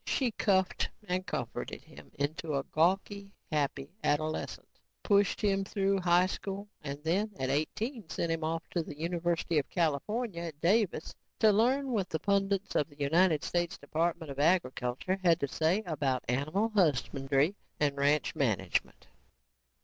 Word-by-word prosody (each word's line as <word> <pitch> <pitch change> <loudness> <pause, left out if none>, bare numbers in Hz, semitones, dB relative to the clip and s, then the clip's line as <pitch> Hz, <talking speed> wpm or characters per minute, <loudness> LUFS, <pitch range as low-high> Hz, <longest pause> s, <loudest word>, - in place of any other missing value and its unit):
She 255 -4 +1
cuffed 190 -3 +1 0.2
and 185 +1 -1
comforted - - -4
him 75 0 -14
into 150 +2 -2
a 135 - 0
gawky 195 +6 0 0.2
happy 140 -2 -1
adolescence, 155 +1 -2 0.2
pushed 205 -1 +3
him 195 -2 +1
through 195 0 0
high 175 0 +4
school 195 +2 -5 0.2
and 140 -1 -4
then, 190 +7 +1
at 130 0 -1
eighteen, 215 - -2
sent 170 - -1
him 165 -1 -1
off 165 +2 -2
to 175 - 0
the 150 -2 -8
University 170 0 0
of 145 - -4
California 175 - -1
at 160 -4 -6
Davis 190 -1 +1 0.2
to 220 -1 +5
learn 255 +6 +2
what 200 -6 0
the 160 - -1
pundits 200 +1 0
of 150 - +1
the 145 - -18
United 155 +2 +3
States 175 -1 -1
Department 160 +1 -2
of 135 - -7
Agriculture 150 +1 +1
had 170 -2 +5
to 140 - 0
say 165 +9 +1
about 140 -6 -1
animal 155 - 0
husbandry 145 - +2 0.3
and 145 -2 +2
ranch 145 +2 +2
management. 105 - -1
170 Hz, 150 wpm, -31 LUFS, 145-195 Hz, 0.3 s, to